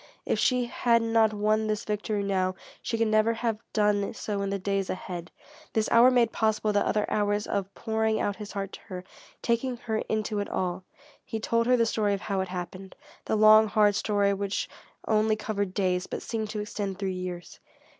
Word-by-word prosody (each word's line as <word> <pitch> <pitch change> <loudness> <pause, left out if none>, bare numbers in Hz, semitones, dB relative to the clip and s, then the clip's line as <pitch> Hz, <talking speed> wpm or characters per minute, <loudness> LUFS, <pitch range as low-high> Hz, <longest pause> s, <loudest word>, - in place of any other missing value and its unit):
If - - 0
she 250 -1 +2
had 235 -1 +2
not 225 -1 +3
won 215 +1 +1
this 215 -1 -2
victory 210 0 -2
now, 185 -2 0 0.3
she 230 - -2
could 225 0 +2
never 215 +1 +3
have 225 -1 -2
done 210 0 +1
so 205 -2 -3
in 200 - -1
the 200 - -1
days 195 0 -1
ahead. 180 -2 -5 0.4
This 220 -1 +1
hour 235 +2 +7
made 240 -3 +3
possible 215 -1 +1
the 205 - +3
other 210 -1 +1
hours 205 0 0
of 195 -1 -2
pouring 220 -1 0
out 205 -1 -1
his 210 -2 -8
heart 195 -1 -4
to - - -8
her, 185 -3 -6 0.4
taking 240 +2 0
her 220 -2 -3
into 215 -1 -1
it 205 - -3
all. 185 0 -2 0.4
He 225 - -4
told 230 +1 +1
her 250 0 +5
the 230 - +3
story 210 -3 +1
of 195 - -7
how 195 0 -1
it 190 - -3
happened, 185 +1 -7 0.3
the - - 0
long, 215 +1 +7
hard 210 -1 +4
story 200 -1 +1
which 200 0 -2 0.4
only 215 0 +3
covered 205 -3 -2
days, 185 -2 0
but - - -5
seemed 220 -2 -3
to 210 0 -3
extend 205 -2 -4
through 195 -1 -2
years. 180 -1 -6
210 Hz, 200 wpm, -27 LUFS, 195-220 Hz, 0.4 s, hour